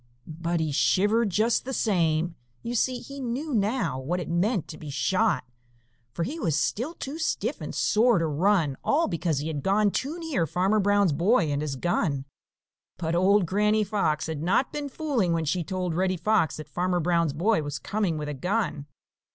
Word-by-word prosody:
But 170 Hz, +2 st, -3 dB
he 160 Hz, -2 st, -1 dB
shivered 205 Hz, +9 st, +2 dB
just 220 Hz, +5 st, +1 dB
the 265 Hz, -, -5 dB
same. 170 Hz, -5 st, +1 dB, 0.3 s
You 235 Hz, -, -3 dB
see, 250 Hz, +2 st, +1 dB
he 275 Hz, 0 st, -9 dB
knew 265 Hz, +4 st, -3 dB
now 205 Hz, -, 0 dB
what 165 Hz, +8 st, -2 dB
it 175 Hz, -, -5 dB
meant 180 Hz, +3 st, 0 dB
to 155 Hz, -, -8 dB
be 150 Hz, -, -8 dB
shot, 185 Hz, -, +1 dB, 0.7 s
for 170 Hz, -, -3 dB
he 300 Hz, -, -4 dB
was 155 Hz, -, 0 dB
still 250 Hz, -, -1 dB
too 290 Hz, +2 st, -6 dB
stiff 320 Hz, -, -1 dB
and -, -, -6 dB
sore 230 Hz, +1 st, +3 dB
to 165 Hz, -, +1 dB
run, 160 Hz, -2 st, +1 dB
all 320 Hz, +4 st, +2 dB
because 170 Hz, -4 st, -1 dB
he 145 Hz, +3 st, -2 dB
had 150 Hz, -3 st, -3 dB
gone 205 Hz, +3 st, +2 dB
too 290 Hz, -, -2 dB
near 310 Hz, -, -1 dB
Farmer 190 Hz, +7 st, +1 dB
Brown's 205 Hz, -4 st, +3 dB
boy 170 Hz, -, +2 dB
and 145 Hz, 0 st, -1 dB
his 150 Hz, -3 st, -3 dB
gun. 140 Hz, -2 st, -1 dB, 0.7 s
But 165 Hz, -1 st, -2 dB
old 190 Hz, +3 st, +4 dB
Granny 210 Hz, +4 st, +2 dB
Fox 170 Hz, -7 st, 0 dB
had 160 Hz, -2 st, -4 dB
not 190 Hz, -, +1 dB
been 290 Hz, -1 st, -3 dB
fooling 255 Hz, -, 0 dB
when 165 Hz, -1 st, 0 dB
she 175 Hz, +4 st, 0 dB
told 180 Hz, 0 st, -3 dB
Reddy 185 Hz, +2 st, 0 dB
Fox 195 Hz, -2 st, +1 dB
that 155 Hz, -2 st, -8 dB
Farmer 180 Hz, +3 st, 0 dB
Brown's 170 Hz, -3 st, +1 dB
boy 185 Hz, +5 st, +2 dB
was 145 Hz, -1 st, -4 dB
coming 195 Hz, 0 st, -1 dB
with 150 Hz, -1 st, -4 dB
a 150 Hz, -, -3 dB
gun. 165 Hz, -, -2 dB
180 Hz, 190 wpm, -26 LUFS, 160-220 Hz, 0.7 s, old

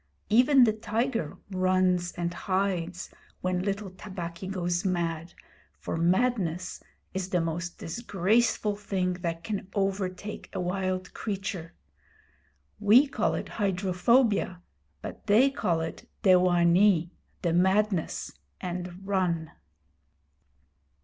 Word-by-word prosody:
Even 255 Hz, +4 st, +6 dB
the 220 Hz, -3 st, +4 dB
tiger 225 Hz, -, -2 dB
runs 185 Hz, -1 st, +2 dB
and 175 Hz, -1 st, -2 dB
hides 185 Hz, -1 st, -2 dB, 0.3 s
when 180 Hz, 0 st, 0 dB
little 195 Hz, 0 st, -3 dB
Tabaqui 185 Hz, -2 st, -7 dB
goes 175 Hz, -2 st, -1 dB
mad, 170 Hz, -3 st, -2 dB, 0.4 s
for -, -, -4 dB
madness 180 Hz, 0 st, 0 dB, 0.3 s
is 190 Hz, 0 st, -3 dB
the 180 Hz, -, +1 dB
most 170 Hz, +1 st, -3 dB
disgraceful 210 Hz, +2 st, +1 dB
thing 190 Hz, -3 st, -1 dB
that 165 Hz, -1 st, -3 dB
can 205 Hz, -3 st, -4 dB
overtake 195 Hz, 0 st, -2 dB
a 190 Hz, -, -3 dB
wild 185 Hz, 0 st, -2 dB
creature. 195 Hz, -5 st, -4 dB, 1.0 s
We 215 Hz, +7 st, +6 dB
call 280 Hz, -, 0 dB
it -, -, -4 dB
hydrophobia, 195 Hz, 0 st, +1 dB, 0.4 s
but -, -, -8 dB
they 235 Hz, +7 st, +5 dB
call 175 Hz, -11 st, 0 dB
it 160 Hz, -, -6 dB
dewanee 180 Hz, -1 st, +4 dB, 0.3 s
the 170 Hz, -2 st, +1 dB
madness 190 Hz, 0 st, +1 dB, 0.3 s
and 180 Hz, +1 st, -6 dB
run. 175 Hz, -5 st, 0 dB
185 Hz, 105 wpm, -28 LUFS, 175-205 Hz, 1.0 s, Even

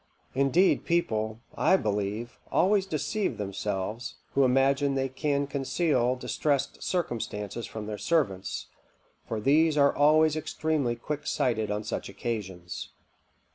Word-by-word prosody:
Indeed 140 Hz, +8 st, +3 dB
people, 110 Hz, -10 st, 0 dB
I 190 Hz, -, +4 dB
believe, 105 Hz, -, -2 dB
always 195 Hz, 0 st, +3 dB
deceive 195 Hz, +6 st, -1 dB
themselves, 105 Hz, +3 st, -3 dB, 0.2 s
who 140 Hz, -, +4 dB
imagine 135 Hz, +2 st, +3 dB
they 135 Hz, 0 st, 0 dB
can 140 Hz, +1 st, 0 dB
conceal 135 Hz, -2 st, +1 dB
distrest 140 Hz, +2 st, -1 dB
circumstances 115 Hz, -, -3 dB
from 110 Hz, -1 st, -6 dB
their 105 Hz, -1 st, -5 dB
servants; 115 Hz, -, 0 dB, 0.6 s
for 110 Hz, -, -2 dB
these 150 Hz, +6 st, +3 dB
are 140 Hz, -1 st, +4 dB
always 155 Hz, +1 st, +5 dB
extremely 155 Hz, -5 st, -1 dB
quicksighted 125 Hz, -5 st, -1 dB
on 105 Hz, +1 st, -2 dB
such 105 Hz, -, -4 dB
occasions." 95 Hz, -4 st, -5 dB
130 Hz, 115 wpm, -28 LUFS, 110-150 Hz, 0.6 s, always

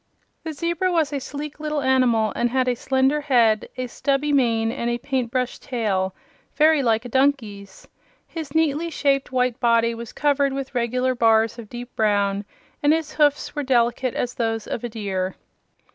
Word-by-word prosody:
The 320 Hz, -, -4 dB
zebra 340 Hz, +4 st, -1 dB
was 315 Hz, -4 st, +1 dB
a 280 Hz, -, -1 dB
sleek 285 Hz, +2 st, -7 dB
little 300 Hz, -2 st, -2 dB
animal 250 Hz, -5 st, +2 dB
and 240 Hz, -, +1 dB
had 255 Hz, +1 st, +1 dB
a 250 Hz, -, +3 dB
slender 265 Hz, +4 st, +1 dB
head, 235 Hz, -7 st, +2 dB
a 255 Hz, -, -2 dB
stubby 280 Hz, +4 st, -1 dB
mane 230 Hz, -4 st, +2 dB
and 235 Hz, 0 st, -2 dB
a 240 Hz, -, 0 dB
paint 255 Hz, -1 st, -2 dB
brush 250 Hz, 0 st, -2 dB
tail 195 Hz, -7 st, -2 dB, 0.4 s
very 310 Hz, -1 st, +4 dB
like 230 Hz, -2 st, +1 dB
a -, -, -4 dB
donkey's. 225 Hz, -7 st, -1 dB, 0.4 s
His 315 Hz, -4 st, -7 dB
neatly 320 Hz, +1 st, +1 dB
shaped 275 Hz, -5 st, 0 dB
white 250 Hz, -1 st, 0 dB
body 230 Hz, -1 st, +3 dB
was 230 Hz, 0 st, -8 dB
covered 285 Hz, -2 st, +1 dB
with 275 Hz, -1 st, -5 dB
regular 250 Hz, +1 st, 0 dB
bars 225 Hz, -1 st, +2 dB
of 220 Hz, -3 st, -10 dB
dark 245 Hz, 0 st, -9 dB
brown, 205 Hz, -2 st, +1 dB, 0.4 s
and 290 Hz, +1 st, +4 dB
his 320 Hz, -1 st, -2 dB
hoofs 295 Hz, -1 st, +1 dB
were 295 Hz, -, -1 dB
delicate 250 Hz, -1 st, +1 dB
as 245 Hz, 0 st, -2 dB
those 225 Hz, -2 st, -2 dB
of 235 Hz, -, -5 dB
a 240 Hz, -, -3 dB
deer. 195 Hz, -4 st, -3 dB
255 Hz, 175 wpm, -23 LUFS, 230-285 Hz, 0.4 s, very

